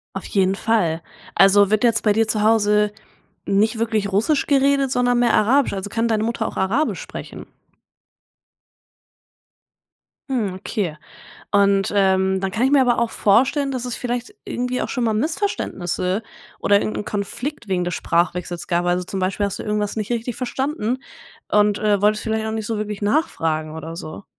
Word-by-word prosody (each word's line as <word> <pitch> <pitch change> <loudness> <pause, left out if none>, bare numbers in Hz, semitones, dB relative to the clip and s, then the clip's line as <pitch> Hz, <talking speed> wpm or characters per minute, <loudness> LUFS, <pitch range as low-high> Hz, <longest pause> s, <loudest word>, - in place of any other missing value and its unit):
Auf 195 - -5
jeden 195 -1 +1
Fall. 180 -8 0 0.3
Also, 195 0 +6
wird 215 +1 +1
jetzt 230 -2 +3
bei 210 - +4
dir 225 +1 +2
zu 215 -1 0
Hause 210 -1 +3 0.6
nicht 215 +4 +2
wirklich 220 -3 -1
Russisch 230 +9 +2
geredet, 275 -1 +3
sondern 245 -1 +2
mehr 240 -1 +3
Arabisch? 260 +6 +3
Also 195 0 -4
kann 230 +2 0
deine 220 -2 +1
Mutter 230 -1 -1
auch - - -7
Arabisch 230 +12 0
sprechen? - - -8 2.9
Mhm, 215 -7 0
okay. 185 -3 -3 0.6
Und, 200 -1 +3
ähm, 190 -1 +2
dann 195 0 -1
kann 215 +5 -2
ich 265 - +3
mir 280 -1 +5
aber 245 -2 +3
auch 235 -1 +1
vorstellen, 270 +8 +2
dass 255 -2 -3
es 245 -2 -3
vielleicht 245 0 -4
irgendwie 250 +1 -2
auch - - -2
schon 250 -3 -2
mal 225 - +2
Missverständnisse 215 - -2 0.4
oder 200 - +4
irgend 105 0 -3
'n 105 - -3
Konflikt 225 +4 -4
wegen 180 -2 0
des 175 - -3
Sprachwechsels 175 0 -1
gab. 175 0 0
Also, 180 +1 +1
zum 190 +2 -4
Beispiel 190 +2 0
hast 200 - -5
du - - -5
irgendwas 210 -1 -1
nicht 215 0 -3
richtig 235 0 -2
verstanden 255 -1 -2 0.6
und, 210 0 +3
äh, 210 -2 +2
wolltest 210 +1 +2
vielleicht 220 0 -1
auch 220 - -3
nicht 220 -1 -3
so 225 -2 -2
wirklich 210 -1 -4
nachfragen 160 - 0
oder 160 +1 -7
so? 155 +3 -8
210 Hz, 175 wpm, -21 LUFS, 195-240 Hz, 2.9 s, Also